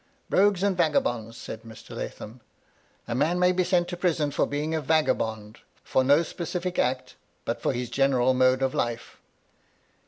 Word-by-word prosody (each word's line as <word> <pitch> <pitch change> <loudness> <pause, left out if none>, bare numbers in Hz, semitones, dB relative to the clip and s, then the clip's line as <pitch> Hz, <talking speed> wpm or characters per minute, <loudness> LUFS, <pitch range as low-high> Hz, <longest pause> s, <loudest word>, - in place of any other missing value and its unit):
" 275 - -40
Rogues 195 -1 +3
and 200 -2 +2
vagabonds," 120 -9 0
said 110 - -8
Mr. 115 -1 -12
Lathom. 115 +4 -7 0.3
" - - -37
A 120 - -2
man 150 +8 +1
may 180 0 +4
be 185 0 +1
sent 175 -1 +1
to 175 - -4
prison 165 -5 0
for 145 - +1
being 150 +2 -2
a 160 - 0
vagabond; 110 -8 0 0.2
for 130 - +1
no 145 +5 +4
specific 175 +2 -4
act, 130 0 -1 0.3
but - - -3
for - - +1
his 125 -1 -4
general 130 -2 +3
mode 130 +1 +3
of 130 - 0
life." 120 0 -3
145 Hz, 180 wpm, -26 LUFS, 125-175 Hz, 0.3 s, may